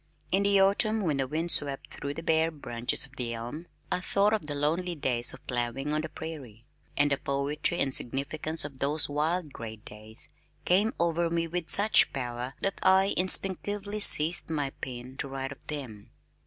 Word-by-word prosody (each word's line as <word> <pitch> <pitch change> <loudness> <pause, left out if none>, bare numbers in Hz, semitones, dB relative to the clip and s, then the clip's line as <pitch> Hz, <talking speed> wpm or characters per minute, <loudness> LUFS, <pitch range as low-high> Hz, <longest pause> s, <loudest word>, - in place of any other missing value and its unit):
In 190 - +2
the 200 0 +3
autumn 215 +3 +2
when 155 -7 -1
the 135 -1 -1
wind 160 +5 -1
swept 140 -2 +2
through 140 0 -6
the 165 - -7
bare 160 0 +2
branches 125 -5 -1
of 135 -1 -20
the 120 -2 -3
elm, 120 +9 -8 0.2
I - - +1
thought 200 +3 +1
of 210 -9 -2
the 145 - -3
lonely 165 +5 -1
days 125 -5 -1
of - - -14
plowing 125 +4 -3
on 155 - 0
the 160 - -6
prairie, 130 -10 -9 0.3
and 145 0 +2
the 140 - 0
poetry 140 +4 -2
and 135 - -1
significance 145 +6 -1
of 140 -2 -9
those 145 +3 0
wild 155 +1 -2
gray 110 -1 -8
days 110 +1 -11 0.4
came 205 +7 +2
over 170 0 0
me 165 0 -1
with 175 0 -5
such 210 +2 +7
power 125 0 -5
that 195 - -3
I 190 +1 +3
instinctively 200 +3 +1
seized 165 -5 +7
my 145 -4 -2
pen 125 0 -9
to 140 - -4
write 135 0 -5
of - - -13
them. 125 -9 -8
150 Hz, 185 wpm, -28 LUFS, 135-175 Hz, 0.4 s, such